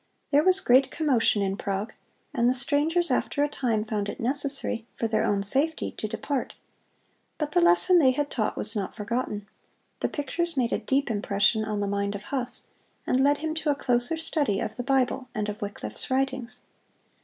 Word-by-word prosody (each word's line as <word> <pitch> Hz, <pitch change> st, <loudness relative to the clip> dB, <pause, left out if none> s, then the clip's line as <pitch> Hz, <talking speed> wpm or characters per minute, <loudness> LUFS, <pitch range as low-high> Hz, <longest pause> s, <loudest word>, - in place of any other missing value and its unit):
There 290 Hz, +1 st, +4 dB
was 370 Hz, +2 st, +5 dB
great 260 Hz, +3 st, +4 dB
commotion 245 Hz, -8 st, +2 dB
in 195 Hz, 0 st, -2 dB
Prague, 200 Hz, +2 st, -3 dB, 0.4 s
and 240 Hz, -3 st, +2 dB
the 255 Hz, -, +2 dB
strangers 310 Hz, +6 st, +1 dB
after 290 Hz, -, 0 dB
a -, -, +2 dB
time 235 Hz, -7 st, -1 dB
found 210 Hz, -2 st, -3 dB
it -, -, -6 dB
necessary, 270 Hz, -2 st, -1 dB
for 230 Hz, -, 0 dB
their 220 Hz, -, +1 dB
own 200 Hz, -1 st, +1 dB
safety, 285 Hz, +10 st, +3 dB
to 215 Hz, -, -5 dB
depart. 255 Hz, +5 st, -3 dB, 0.8 s
But 300 Hz, -1 st, -3 dB
the 175 Hz, -, +3 dB
lesson 175 Hz, -, +5 dB
they 270 Hz, -5 st, +5 dB
had 285 Hz, +2 st, -1 dB
taught 215 Hz, -4 st, -1 dB
was 215 Hz, +2 st, +2 dB
not 200 Hz, -3 st, -3 dB
forgotten. 210 Hz, -1 st, -3 dB, 0.5 s
The -, -, -1 dB
pictures 330 Hz, +3 st, -2 dB
made 240 Hz, -2 st, +1 dB
a -, -, 0 dB
deep 275 Hz, -2 st, 0 dB
impression 205 Hz, +1 st, +2 dB
on 210 Hz, -1 st, -2 dB
the 200 Hz, -, -1 dB
mind 200 Hz, 0 st, -1 dB
of 200 Hz, -, -7 dB
Huss, 255 Hz, -3 st, -4 dB, 0.4 s
and 260 Hz, +1 st, +2 dB
led 285 Hz, +1 st, +4 dB
him 315 Hz, -, -1 dB
to 315 Hz, -1 st, -2 dB
a 290 Hz, -, +3 dB
closer 245 Hz, +3 st, +1 dB
study 295 Hz, -10 st, 0 dB
of 215 Hz, -, -4 dB
the -, -, -4 dB
Bible 260 Hz, 0 st, 0 dB
and 210 Hz, -1 st, -1 dB
of 210 Hz, +2 st, -7 dB
Wycliffe's 110 Hz, -, -5 dB
writings. 260 Hz, -2 st, -2 dB
245 Hz, 190 wpm, -26 LUFS, 210-285 Hz, 0.8 s, was